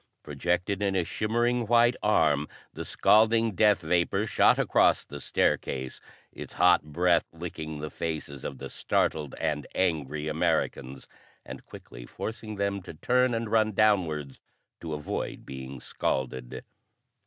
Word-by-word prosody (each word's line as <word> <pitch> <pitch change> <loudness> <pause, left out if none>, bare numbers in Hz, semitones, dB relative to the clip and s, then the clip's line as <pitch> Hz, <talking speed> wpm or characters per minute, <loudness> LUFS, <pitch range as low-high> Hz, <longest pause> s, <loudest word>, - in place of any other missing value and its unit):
Projected 90 +7 -1
in 100 -1 0
a 90 - +2
shimmering 120 +5 0
white 120 +1 +4
arm 75 -8 +2 0.3
the - - -6
scalding 115 +1 +3
death 105 0 +3
vapor 90 +5 +1
shot - - +4
across - - +3
the 70 - -9
staircase, 65 -2 -1 0.3
its - - -10
hot 90 0 +5
breath 85 +3 +2
licking 80 -2 -6
the 75 +1 -6
faces 75 -4 -5
of - - -5
the 70 - -7
startled 75 +1 -1
and 75 -3 -2
angry 75 -4 -1
Americans, 80 -4 -1 0.4
and - - -10
quickly - - -11
forcing 110 -1 -6
them 100 0 -1
to 85 - -10
turn 125 +7 +2
and 115 -1 -3
run 110 -1 +3
downwards 85 -10 +1 0.4
to 80 -2 -5
avoid 75 0 -5
being 65 0 -8
scalded. 65 0 -3
85 Hz, 135 wpm, -27 LUFS, 75-105 Hz, 0.4 s, hot